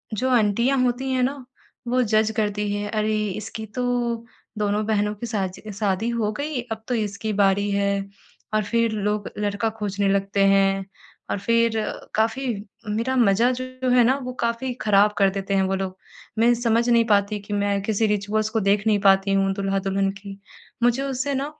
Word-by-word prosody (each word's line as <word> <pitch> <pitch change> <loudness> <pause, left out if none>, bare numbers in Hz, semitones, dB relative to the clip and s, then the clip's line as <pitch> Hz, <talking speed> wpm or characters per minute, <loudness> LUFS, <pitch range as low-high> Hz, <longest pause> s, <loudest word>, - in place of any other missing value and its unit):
जो 260 +5 0
आंटियाँ 235 +2 +2
होती 255 +2 -1
हैं 260 -1 +1
ना, 270 0 -2 0.4
वो 250 +1 +2
जज़ 220 -1 +2
करती 210 -1 -1
हैं 205 0 -3
अरे 215 0 0
इसकी 215 +3 -6
तो 250 - -1 0.7
दोनों 210 0 0
बहनों 210 -1 +1
की 235 +3 -6
शाजि 205 -1 -4
शादी 205 +2 0
हो 225 -3 0
गई 285 +1 -3
अब 220 0 -4
तो 250 - 0
इसकी 215 0 -2
बारी 200 0 +2
है 200 0 +1 0.6
और 215 - +2
फ़िर 230 +2 +1
लोग 210 -1 -1
लड़का 205 +1 -1
खोजने 200 -1 -1
लगते 195 0 +1
हैं। 195 0 +3 0.5
और - - -1
फ़िर 230 +2 +2 0.4
काफ़ी 225 +5 0 0.4
मेरा 230 +5 -1
मज़ा 230 +2 +4
जो 255 0 -4
है 245 -1 +5
ना, 255 +3 +3
वो 255 0 -5
काफ़ी 235 +2 -1
ख़राब 210 0 +4
कर 195 -1 +4
देते 195 0 -3
हैं 190 - +3
वो 190 0 0
लोग 190 -1 -4 0.4
मैं 235 +1 +5
समझ 235 0 +1
नहीं 235 -1 +4
पाती 205 -1 +2
कि 205 +1 -7
मैं 200 -1 0
किसी 220 +1 +1
रिचुअल्स 210 +1 0
को 225 0 0
देख 200 0 +2
नहीं 210 -2 +3
पाती 195 0 +4
हूँ 195 0 +2
दूल्हा-दुल्हन 195 0 0
की 195 0 -10 0.4
मुझे 245 +3 +3
उससे 275 +1 -2
ना, 270 +1 -1
210 Hz, 180 wpm, -23 LUFS, 200-235 Hz, 0.7 s, है